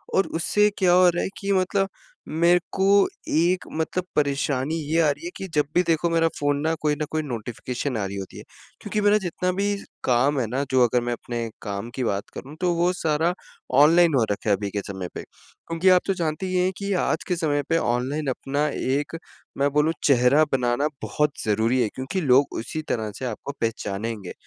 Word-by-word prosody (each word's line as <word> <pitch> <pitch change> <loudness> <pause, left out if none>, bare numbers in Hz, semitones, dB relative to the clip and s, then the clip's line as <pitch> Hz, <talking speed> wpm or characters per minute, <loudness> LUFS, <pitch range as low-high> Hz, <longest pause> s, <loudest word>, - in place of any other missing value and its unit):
और 195 - +3
उससे 210 +3 +3
क्या 180 -3 +4
हो 180 0 +6
रहा 175 0 -1
है - - -2
कि 200 0 -2
मतलब 195 +1 +1 0.4
मेरे 170 +2 +3
को 190 - -1 0.5
एक 175 +4 +2 0.2
मतलब 175 +3 -1
परेशानी 140 0 0 0.2
ये 165 - +3
आ 155 - +4
रही 145 +3 -7
है 175 - -4
कि 195 - -5
जब 150 - +3
भी 175 - +6
देखो 165 +1 +2
मेरा 165 0 +3
फोन 145 0 +1
ना 160 +2 +1
कोई 150 -1 +1
ना 150 +1 -3
कोई 155 0 0
नोटिफ़िकेशन 125 +1 -4
आ 100 - -1
रही 100 +1 -5
होती 95 - -7
है, - - -9 0.4
क्योंकि 210 - -2
मेरा 205 +1 +5
जितना 180 0 -2
भी 200 +2 0 0.3
काम 135 +3 +2
है 125 - 0
ना 130 +5 -1
जो 130 -1 +5
अगर 120 +1 +2
मैं 120 - 0
अपने 120 -1 -4
काम 100 +1 -5
की 130 - -2
बात 100 -3 -2
करूँ 140 +3 -9
तो 180 -1 +2
वो 175 +2 +2
सारा 160 0 0 0.5
ऑनलाइन 165 +2 +6
हो 125 - +4
रखा 105 +1 -2
है 100 - +5
अभी 100 0 -4
के 100 - -2
समय 95 -3 -5
पे। - - -5
क्योंकि 165 +3 -3
आप 180 -1 +6
तो 195 - +2
जानती 165 0 -2
ही 185 - -2
हैं 180 +1 +2
कि 200 0 -3
आज - - 0
के 180 - 0
समय 145 -4 0
पे 165 - +3
ऑनलाइन 135 +3 -1
अपना 140 +3 -1
एक, 145 +5 -2 0.4
मैं 140 +1 +2
बोलूँ 150 +2 +3
चेहरा 135 +2 +5
बनाना 125 +2 +1 0.2
बहुत 150 -1 0
ज़रूरी 110 +4 +2
है 110 - -1
क्योंकि 130 +9 -3
लोग 135 -2 +4
उसी 155 +7 -4
तरह 110 -3 -1
से 130 - -5
आपको 120 +3 -5
पहचानेंगे। 105 -2 -3
145 Hz, 210 wpm, -24 LUFS, 120-175 Hz, 0.5 s, हो